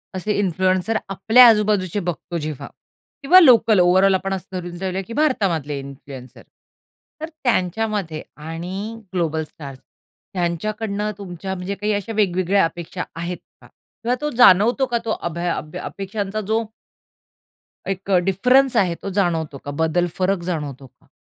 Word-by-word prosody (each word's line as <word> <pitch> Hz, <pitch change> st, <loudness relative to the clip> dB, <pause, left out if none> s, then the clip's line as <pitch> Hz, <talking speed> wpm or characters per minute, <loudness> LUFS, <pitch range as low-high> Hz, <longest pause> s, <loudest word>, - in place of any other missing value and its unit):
असे 205 Hz, +3 st, -1 dB
इन्फ्लुएन्सर 185 Hz, +3 st, +1 dB, 0.2 s
आपल्या 225 Hz, +6 st, +7 dB
आजूबाजूचे 210 Hz, -4 st, +2 dB
बघतो 170 Hz, +1 st, -5 dB
जेव्हा 155 Hz, -3 st, -5 dB, 0.5 s
किंवा 355 Hz, +7 st, +7 dB
लोकल 230 Hz, -, +6 dB
ओव्हरऑल 190 Hz, +2 st, +5 dB
आपण 195 Hz, +1 st, -2 dB
असं 190 Hz, 0 st, -6 dB
धरून 175 Hz, 0 st, -7 dB
जाऊ, 190 Hz, 0 st, -3 dB, 0.2 s
की 230 Hz, -, -7 dB
भारतामधले 175 Hz, -, 0 dB
इन्फ्लुएन्सर. 135 Hz, -1 st, -11 dB, 0.8 s
तर 320 Hz, -, -4 dB
त्यांच्यामध्ये 200 Hz, -5 st, -1 dB, 0.2 s
आणि 185 Hz, +8 st, -6 dB
ग्लोबल 160 Hz, -3 st, -1 dB
स्टार्स 140 Hz, -3 st, -11 dB, 0.5 s
त्यांच्याकडनं 205 Hz, +4 st, -2 dB
तुमच्या 190 Hz, 0 st, -6 dB
म्हणजे 185 Hz, +2 st, -4 dB
काही 210 Hz, +2 st, -2 dB
अशा 205 Hz, +3 st, -3 dB
वेगवेगळ्या 190 Hz, -1 st, +2 dB
अपेक्षा 175 Hz, +2 st, -5 dB, 0.2 s
आहेत 175 Hz, +1 st, -4 dB, 0.2 s
का? -, -, -16 dB
किंवा 245 Hz, +2 st, -5 dB
तो 300 Hz, -, -1 dB
जाणवतो 240 Hz, +4 st, +6 dB
का 240 Hz, -2 st, -1 dB
तो 220 Hz, -, -1 dB, 0.2 s
अभय 170 Hz, +2 st, -4 dB
अभ 155 Hz, -1 st, -4 dB
अपेक्षांचा 200 Hz, +1 st, -4 dB
जो. 220 Hz, +3 st, 0 dB, 1.2 s
एक 195 Hz, 0 st, -4 dB
अ, 185 Hz, -, +5 dB
डिफरन्स 250 Hz, +9 st, +3 dB
आहे 180 Hz, -5 st, +2 dB
तो 200 Hz, -, -3 dB
जाणवतो 160 Hz, -6 st, -1 dB
का 145 Hz, -, -4 dB
बदल, 175 Hz, +2 st, +1 dB
फरक 190 Hz, 0 st, +1 dB
जाणवतो 140 Hz, -4 st, -5 dB
का? -, -, -32 dB
190 Hz, 140 wpm, -21 LUFS, 170-215 Hz, 1.2 s, आपल्या